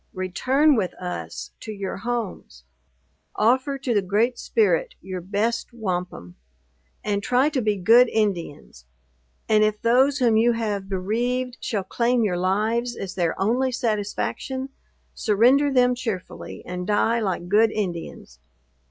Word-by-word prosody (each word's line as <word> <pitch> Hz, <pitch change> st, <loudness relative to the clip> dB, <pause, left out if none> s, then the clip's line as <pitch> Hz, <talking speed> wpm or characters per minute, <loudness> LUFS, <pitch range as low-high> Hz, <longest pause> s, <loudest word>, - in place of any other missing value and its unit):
Return 260 Hz, -, +2 dB
with 195 Hz, -6 st, -1 dB
us 80 Hz, -, -6 dB
to -, -, -7 dB
your 200 Hz, -2 st, -5 dB
homes. 220 Hz, -, -5 dB, 0.7 s
Offer 260 Hz, +5 st, +2 dB
to 260 Hz, -2 st, -2 dB
the 205 Hz, -, +3 dB
Great 215 Hz, +6 st, 0 dB
Spirit 195 Hz, -7 st, +1 dB
your 185 Hz, -1 st, -6 dB
best 210 Hz, +7 st, -1 dB
wampum, 180 Hz, -, -5 dB, 0.7 s
and 205 Hz, -1 st, -1 dB
try 250 Hz, +7 st, +2 dB
to 285 Hz, -4 st, -1 dB
be 210 Hz, -2 st, +1 dB
good 230 Hz, +6 st, +6 dB
Indians! 175 Hz, -, -3 dB, 0.6 s
And, 215 Hz, -1 st, +4 dB
if 215 Hz, 0 st, +1 dB
those 255 Hz, +4 st, +3 dB
whom 235 Hz, -4 st, +3 dB
you 235 Hz, +2 st, +4 dB
have 205 Hz, -4 st, -3 dB
bereaved 240 Hz, +6 st, -1 dB
shall 205 Hz, -4 st, -2 dB
claim 235 Hz, +4 st, +1 dB
your 185 Hz, -4 st, 0 dB
lives 220 Hz, +6 st, 0 dB
as 190 Hz, -1 st, -5 dB
their 170 Hz, -3 st, -1 dB
only 245 Hz, +6 st, +1 dB
satisfaction, 245 Hz, +4 st, -2 dB, 0.4 s
surrender 250 Hz, +7 st, +3 dB
them 250 Hz, -1 st, +4 dB
cheerfully, 225 Hz, -7 st, -6 dB
and 180 Hz, 0 st, -5 dB
die 225 Hz, +2 st, +2 dB
like 185 Hz, -5 st, -2 dB
good 215 Hz, +4 st, +4 dB
Indians. 170 Hz, -, -5 dB
215 Hz, 135 wpm, -23 LUFS, 185-245 Hz, 0.7 s, good